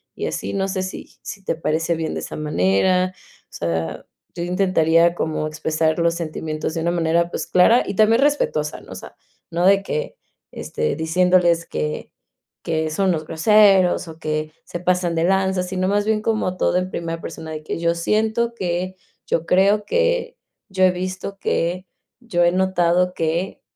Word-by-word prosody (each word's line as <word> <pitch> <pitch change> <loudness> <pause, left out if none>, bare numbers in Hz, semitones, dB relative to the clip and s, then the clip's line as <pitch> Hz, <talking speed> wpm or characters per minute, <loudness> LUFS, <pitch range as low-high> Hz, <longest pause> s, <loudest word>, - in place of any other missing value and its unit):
y - - -3
así - - -4
no 195 -1 0
sé 185 0 -2
si 185 - -8
sí 200 - -8
te 175 - -1
parece 165 +1 -1
bien 160 -1 -3
de - - -3
esa - - -7
manera. 155 - +1 0.4
O - - -25
sea, 80 -2 -3 0.3
yo 170 - -3
intentaría 170 -2 +3
como 155 -2 -2
expresar 155 +1 -1
los 170 0 +2
sentimientos 155 -1 -4
de 165 - -2
una 170 +1 0
manera, 170 0 +1
pues, - - -4
clara 225 +7 +5
y 200 - -4
también 220 +4 +4
respetuosa, 275 - 0
¿no? - - -15
O - - -9
sea, - - -10 0.4
no 170 +2 0
de 195 +1 +5
que, 470 - -3 0.4
este, 465 0 -3
diciéndoles 170 +1 +2
que 75 0 -4 0.5
que 160 -1 -1
son 190 +3 +1
los 155 -2 -2
groseros 190 +1 +4
o 160 0 -10
que 155 0 -3
se 175 - -6
pasan 180 -1 0
de 165 +1 +1
lanza, 190 0 +1
sino 185 0 -2
más 205 +1 +1
bien 215 0 +1
como 215 -4 -1
todo - - +2
en 185 0 -1
primera 165 -1 -4
persona, 160 -1 -7
de 155 -1 -5
que - - -4
"yo 170 0 +2
siento 220 +6 0
que", 185 -2 -2 0.3
"yo 165 - 0
creo 200 +4 +3
que", - - 0 0.3
"yo 190 -1 +3
he 185 - +5
visto 185 +2 -5
que", 180 +1 -1 0.3
"yo 180 -8 +1
he 175 - +3
notado 180 -1 +2
que", 170 +3 -2
180 Hz, 180 wpm, -21 LUFS, 160-190 Hz, 0.5 s, clara